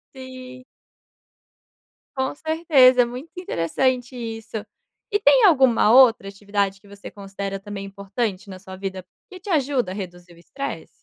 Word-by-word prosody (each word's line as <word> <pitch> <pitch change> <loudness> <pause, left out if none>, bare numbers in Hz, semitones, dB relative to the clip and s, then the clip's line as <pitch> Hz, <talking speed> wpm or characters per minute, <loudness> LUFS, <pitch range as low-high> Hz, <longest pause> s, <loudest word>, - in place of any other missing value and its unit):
Sim. 255 -1 -10 1.5
Com 265 +1 -2
certeza, 300 -6 +4
é - - +3
muito 250 +7 -9
interessante 250 - -1
isso. 225 -2 -6 0.5
E 410 - +2
tem - - +5
alguma 265 - +4
outra 240 -5 +6
atividade 200 0 -2
que 200 - -21
você 200 0 -11
considera 195 -1 -6
também 200 0 -7
importante 200 +1 -4
na 185 -1 -9
sua 190 0 -10
vida, 190 -1 -6 0.3
que 370 - -10
te 390 +3 -10
ajuda 275 - 0
a 190 - -6
reduzir 175 -3 -9
o - - -20
estresse? 275 +10 -6
225 Hz, 145 wpm, -22 LUFS, 195-265 Hz, 1.5 s, outra